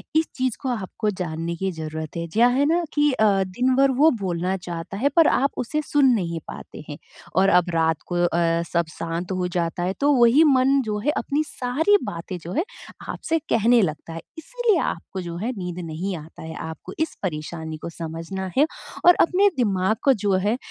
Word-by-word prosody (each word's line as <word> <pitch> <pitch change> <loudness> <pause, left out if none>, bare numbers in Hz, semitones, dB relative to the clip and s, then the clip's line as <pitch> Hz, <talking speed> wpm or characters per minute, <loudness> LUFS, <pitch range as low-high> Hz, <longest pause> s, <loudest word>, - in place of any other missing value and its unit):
इस 320 +1 +4
चीज़ 255 -3 -1
को 265 - -2
आपको 215 -2 -2
जानने 165 -1 -3
की 190 +3 -2
ज़रूरत 160 -2 -6
है, 170 - -2
क्या 235 +3 +5
है 260 +3 +2
ना 335 +3 +2
कि 295 0 +3
अ, 220 - +2 0.2
दिन 250 +8 +1
भर 275 +1 +4
वो 310 +2 +7
बोलना 180 0 -1
चाहता 175 +1 -6
है 270 +7 +2
पर 330 -2 +6
आप 275 +2 +2
उसे 300 +5 -1
सुन 290 -1 +2
नहीं 170 -6 -1
पाते - - -9
हैं। 145 - -6 0.4
और 195 +1 +4
अब 180 -2 +4
रात 160 -1 +2
को - - 0
अ, 170 -1 +1
सब 170 -1 +2
शांत 165 +3 -4
हो 185 -1 -1
जाता 170 0 -1
है 185 +2 0
तो 290 +1 +4
वही 245 +5 +6
मन 270 -1 +4
जो 210 -1 -2
है 295 - +4
अपनी 295 +2 0
सारी 300 +12 +2
बातें 175 +2 -5
जो 170 - -6
है 320 - +1 0.5
आपसे 325 0 -1
कहने 230 +2 +4
लगता 160 -2 -3
है। 165 - -6 0.2
इसीलिए 450 +3 0
आपको 185 +3 -4
जो 170 -1 -6
है 220 +8 -2
नींद 180 -2 -5
नहीं 175 +5 -3
आता 160 +1 -11
है। 160 0 -7 0.2
आपको 160 +3 -9
इस 320 0 -1
परेशानी 160 -2 -4
को - - -4
समझना 165 +3 -5
है 290 - +6 0.4
और 355 0 +8
अपने 380 +4 +4
दिमाग 200 -3 +1
को 275 - +5
जो 200 - +3
है 225 +3 +1
190 Hz, 205 wpm, -23 LUFS, 170-270 Hz, 0.5 s, और